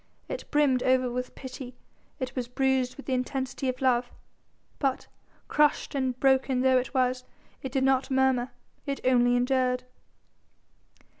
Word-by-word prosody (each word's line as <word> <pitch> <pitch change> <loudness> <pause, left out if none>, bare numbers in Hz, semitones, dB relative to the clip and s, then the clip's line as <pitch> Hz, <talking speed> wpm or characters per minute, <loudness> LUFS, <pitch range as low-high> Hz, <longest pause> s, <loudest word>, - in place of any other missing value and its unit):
It - - -6
brimmed 280 -4 +3
over 255 -1 +2
with 250 +1 -4
pity, 255 -1 -8 0.4
it 255 0 -4
was 250 -2 -2
bruised 265 0 0
with 280 - -10
the 265 - -2
intensity 260 +1 -2
of 255 +1 -4
love: 245 -1 +2 0.7
but, 270 -3 0 0.4
crushed 300 +1 +2
and 260 -3 -1
broken 265 -1 +3
though 260 0 +4
it 250 0 -6
was, 255 -1 +1 0.4
it 265 - -5
did 265 0 0
not 265 +1 +2
murmur, 265 -2 +2 0.4
it 275 0 -2
only 245 -1 +4
endured. 250 0 +1
260 Hz, 145 wpm, -27 LUFS, 250-265 Hz, 0.7 s, though